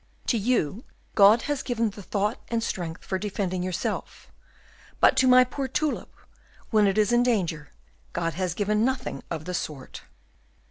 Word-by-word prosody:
To - - +1
you 220 - 0 0.3
God 210 +3 +6
has 290 -2 -2
given 230 -3 -1
the 205 - -10
thought 205 +3 -1
and 230 -1 -1
strength 175 -6 -4
for 190 - -2
defending 190 -2 -2
yourself; 185 -1 -4 0.7
but - - +5
to 260 - +4
my 255 0 +8
poor 265 +2 -4
tulip, 295 +3 -2 0.6
when 215 -2 +4
it 195 - 0
is 215 0 +3
in 240 - +5
danger, 175 - 0 0.4
God 165 -1 -2
has 180 -1 -2
given 210 +1 +1
nothing 260 +1 -2
of 160 -2 -5
the 180 - -4
sort." 150 -6 -5
210 Hz, 165 wpm, -26 LUFS, 180-240 Hz, 0.7 s, my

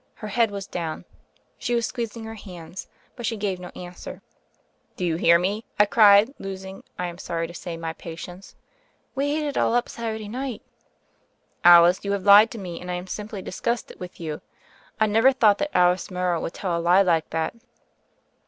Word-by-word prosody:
Het 210 -1 -7
head 230 +1 +3
was 200 -1 -6
down; 165 -4 -5 0.5
she 240 - -1
was 235 -1 +1
squeezing 230 -2 -5
her 220 - -7
hands, 180 -4 -9 0.3
but 240 - -8
she 225 -1 -1
gave 195 -3 -2
no 180 - -8
answer. 180 0 -9 0.7
*'Do 180 - -3
you 165 -2 0
hear 170 0 +5
me?" 200 +5 -2 0.2
I 210 - +7
cried, 210 +3 +6
losing, 190 0 -7
I 180 - -2
am 175 0 -7
sorry 165 -2 -3
to 170 - -9
say, 170 -1 -6
my 165 -1 -4
patience. 175 +3 -10 0.6
"We 285 +2 0
ate 305 - -2
it 285 - -3
all 230 - +2
up 245 - +1
Saturday 220 -2 -5
night." 250 +1 -5 1.0
"Alice, 175 +1 +7
you 200 0 -1
have 200 -2 -2
lied 205 +3 +8
to 230 - -8
me, 180 -5 -7
and 180 - -8
I 180 - -1
am 180 +1 -5
simply 205 0 -6
disgusted 235 +5 -3
with 180 -1 -9
you. 155 -3 -5 0.6
I 220 - +5
never 225 +5 +4
thought 220 -6 +3
that 295 0 -1
Alice 180 +1 +3
Morrow 180 -3 -1
would - - -5
tell 185 -4 -2
a 170 - -1
lie 180 +3 +5
like 165 -4 +1
that." 160 0 -2
195 Hz, 195 wpm, -24 LUFS, 175-220 Hz, 1.0 s, lied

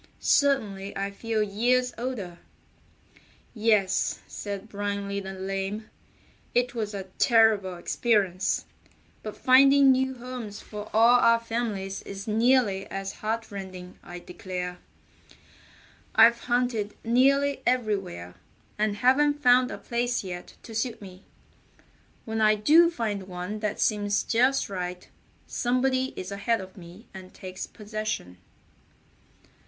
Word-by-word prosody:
Certainly 210 -9 +1
I 200 0 -2
feel 220 +1 -1
years 245 +5 +1
older." 220 -8 -5 1.1
"Yes," 215 -4 +1 0.3
added 200 +1 -4
Brindley 200 -1 -3
the 190 -1 -6
Lame, 195 +3 -4 0.6
"it 245 0 +2
was 215 -3 -3
a 195 - -4 0.2
terrible 220 -5 +4
experience, 190 0 0 0.6
but 215 - -7
finding 275 +1 +6
new 265 0 +1
homes 240 -4 -7
for 210 0 -8
all 230 +3 +6
our 230 -1 +5
families 225 -5 -3
is 195 +1 -8
nearly 220 -3 +2
as 195 0 -5
heart 220 +1 -3
rending. 185 -2 -8
I 175 - -9
declare, 180 0 -6 1.4
I've 230 +1 +7
hunted 240 -4 0
nearly 275 +4 +3
everywhere, 200 - -1 0.5
and 210 -1 +1
haven't 290 +6 +3
found 250 0 +5
a - - -6
place 240 0 -2
yet 180 -2 -8
to 225 - -10
suit 225 +1 -2
me. 185 -2 -12 1.0
When 220 0 -2
I 215 0 +5
do 310 +11 +5
find 210 - -3
one 180 +3 -5
that 210 -1 -3
seems 205 -1 +1
just 255 +4 +2
right 180 -2 -5 0.4
somebody 255 +1 0
is 185 +1 -6
ahead 215 +3 0
of 190 -1 -10
me 180 +4 -13
and 185 -1 -11
takes 185 0 -7
possession." 215 - -5
215 Hz, 120 wpm, -26 LUFS, 195-245 Hz, 1.4 s, I've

